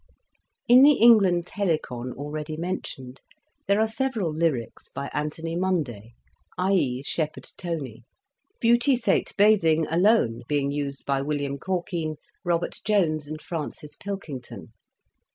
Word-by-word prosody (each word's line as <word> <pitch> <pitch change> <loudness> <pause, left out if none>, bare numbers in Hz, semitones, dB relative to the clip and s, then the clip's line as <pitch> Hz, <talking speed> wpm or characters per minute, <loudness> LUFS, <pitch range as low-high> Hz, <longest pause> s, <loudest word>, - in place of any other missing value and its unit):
In 245 +2 +8
the 290 +2 +8
"England's 200 -9 +5
Helicon 155 -10 -2
" - - -17
already 150 +2 -5
mentioned 140 -7 -5 0.5
there 200 +1 +3
are 220 - +4
several 220 - -1
lyrics 150 -8 -2
by 140 0 -6
Anthony 160 +2 -3
Munday, 145 - -2 0.4
i.e. 180 -9 +1
Shepherd 155 +1 -3
Tonie; 150 - -5 0.6
"Beautie 240 +3 +4
sate 235 - +1
bathing" 175 -7 +4
alone 170 - +3
being 140 -1 0
used 140 -1 -4
by 135 -1 0
William 140 -1 -2
Corkine, 175 -3 -2 0.3
Robert 175 -2 -1
Jones, 160 -8 +1
and 155 +1 -6
Francis 150 -2 -6
Pilkington. 165 -11 -7
160 Hz, 120 wpm, -25 LUFS, 140-195 Hz, 0.6 s, In